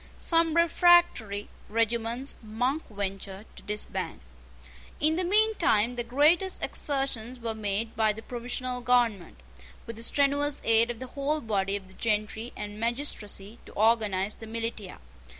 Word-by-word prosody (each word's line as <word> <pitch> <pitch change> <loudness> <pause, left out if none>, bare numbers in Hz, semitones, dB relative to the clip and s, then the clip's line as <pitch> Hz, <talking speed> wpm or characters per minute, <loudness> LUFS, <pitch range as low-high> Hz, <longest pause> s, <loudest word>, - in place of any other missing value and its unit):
Some 330 -1 +2
refractory 335 - +4 0.2
regiments 230 +4 -1
Monk 245 +7 -1
ventured 195 -1 -5
to - - -9
disband. 210 - -4 0.8
In 310 +2 +3
the 365 - 0
mean 430 +5 +4
time 235 - +2
the 245 - -3
greatest 305 +10 +2
exertions 255 -4 0
were 230 -1 -3
made 215 +1 -2
by 220 -1 +3
the 220 +1 -8
provisional 250 +1 -4
government, 235 - +1 0.5
with 230 -1 -8
the - - -8
strenuous 285 +3 +2
aid 230 +1 +5
of 240 - -4
the 260 - -5
whole 290 +2 0
body 200 -5 -1
of 195 -2 -6
the 190 - -16
gentry 220 +2 -2
and 210 0 -7
magistracy, 230 -3 -1
to - - -13
organise 210 -2 +2
the 225 - -11
militia. 225 -3 -4
230 Hz, 145 wpm, -28 LUFS, 210-275 Hz, 0.8 s, aid